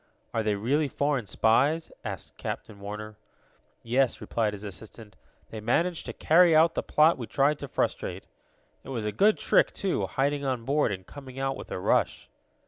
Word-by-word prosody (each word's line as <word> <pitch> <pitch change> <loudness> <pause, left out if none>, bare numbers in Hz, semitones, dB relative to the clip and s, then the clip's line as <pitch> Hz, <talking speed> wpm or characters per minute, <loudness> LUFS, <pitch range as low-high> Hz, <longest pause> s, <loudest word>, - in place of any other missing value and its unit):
"Are 115 - +1
they 105 -1 0
really 140 +9 +1
foreign 140 -4 -1
spies?" 140 +12 +2
asked - - -7
Captain 100 - -6
Warner. 105 +1 -7 0.7
"Yes," 125 +2 +1
replied 110 -3 -1
his 105 0 -8
assistant. 105 +1 -10 0.4
"They 110 - -6
managed 165 +10 0
to - - -4
carry 170 0 +5
out 165 +1 +5
the - - -1
plot 155 0 +3
we 120 - -5
tried 140 +6 +2
to 140 - -6
frustrate. - - -2 0.6
It - - -11
was 115 -5 -3
a 105 - -1
good 210 - +3
trick, - - +3
too, 195 -2 -1
hiding 140 +1 0
on 130 -4 -2
board, 145 -2 +2
and 95 -1 -5
coming 135 -2 -11
out 135 0 -1
with - - -9
a - - -4
rush." 90 - 0
130 Hz, 180 wpm, -27 LUFS, 110-150 Hz, 0.7 s, carry